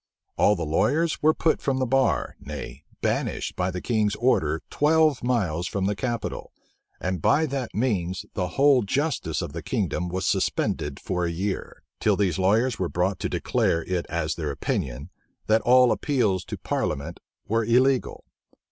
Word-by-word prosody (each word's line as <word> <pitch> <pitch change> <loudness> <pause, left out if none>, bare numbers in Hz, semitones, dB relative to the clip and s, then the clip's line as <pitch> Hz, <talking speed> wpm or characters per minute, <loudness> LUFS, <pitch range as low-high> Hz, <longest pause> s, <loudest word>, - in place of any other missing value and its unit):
All 105 - +4
the 85 -3 -3
lawyers 140 - +1
were 155 +1 +4
put 160 - +1
from 135 -2 0
the 130 - +1
bar, 125 - +1
nay, - - -8 0.2
banished - - -1
by 90 0 0
the 90 -1 -4
King's 105 -3 +1
order 80 -10 +1
twelve 155 -3 +3
miles 90 -9 0
from 100 -1 -2
the 100 +1 0
capital, 120 0 -4 0.5
and 90 -2 -2
by 155 - +3
that 135 -5 -4
means 95 -6 -1
the 90 -2 -1
whole 140 -2 +5
justice 110 - -1
of 80 -4 -6
the 85 - -5
kingdom 90 - -2
was 95 +1 -2
suspended 75 -1 0
for 90 -2 -2
a 85 - -1
year; 95 +4 -4 0.2
till - - +2
these 95 -5 +1
lawyers 110 +6 +2
were 90 - -1
brought 90 +2 0
to - - -2
declare 85 0 0
it 90 -2 -2
as 85 -2 -1
their 80 -3 -4
opinion, 70 +2 -3 0.3
that 110 +1 +3
all 125 0 +5
appeals 110 -12 +1
to - - -6
parliament 70 +5 -3 0.3
were 115 +3 +1
illegal. 125 +3 +2
100 Hz, 165 wpm, -25 LUFS, 85-130 Hz, 0.5 s, whole